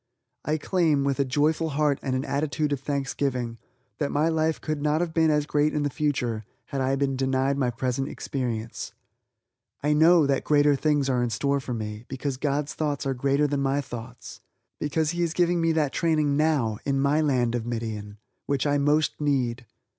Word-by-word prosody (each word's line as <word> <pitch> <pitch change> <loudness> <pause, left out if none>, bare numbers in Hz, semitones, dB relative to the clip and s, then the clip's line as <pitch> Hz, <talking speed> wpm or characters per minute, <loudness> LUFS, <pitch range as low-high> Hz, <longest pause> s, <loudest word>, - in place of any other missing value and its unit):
I 155 +1 0
claim, 160 -3 +1
with 140 0 0
a 140 - +3
joyful 150 +4 +1
heart 150 -2 +2
and 130 -2 -1
an 130 - -1
attitude 145 +1 -1
of 140 - -2
thanksgiving, 135 -4 -2 0.4
that 145 -2 0
my 150 +3 +2
life 160 0 +1
could 155 -2 -3
not 150 +1 +1
have 170 -2 -2
been 160 -1 +3
as 150 -1 +2
great 150 +1 +1
in 150 - +1
the 145 - -1
future 125 -7 -1 0.2
had 135 - -3
I 130 +1 +1
been 135 -1 0
denied 135 +1 +1
my 135 -3 +1
present 130 +2 -2
experience. 115 -4 -4 0.9
I 150 +1 +3
know 160 +1 +6
that 140 -1 +1
greater 145 -1 +4
things 145 -1 +1
are 125 -2 +1
in 120 - 0
store 140 +5 0
for 125 -2 -4
me, 105 0 -5
because 135 0 -3
God's 145 +2 -1
thoughts 145 -2 -2
are 135 - 0
greater 140 +3 +1
than 145 -1 0
my 135 +1 +1
thoughts; 125 -2 -8 0.4
because 150 +1 0
He 175 0 -2
is 170 -1 0
giving 175 -1 +2
me 165 0 +3
that 150 -4 0
training 155 -4 +1
now, 145 -8 +1
in 135 -1 0
my 140 +3 +2
land 125 -6 +1
of 120 -1 -2
Midian, 110 -3 -4 0.3
which 140 -1 0
I 145 0 +2
most 150 +2 +1
need. 130 -5 0
140 Hz, 195 wpm, -26 LUFS, 130-150 Hz, 0.9 s, know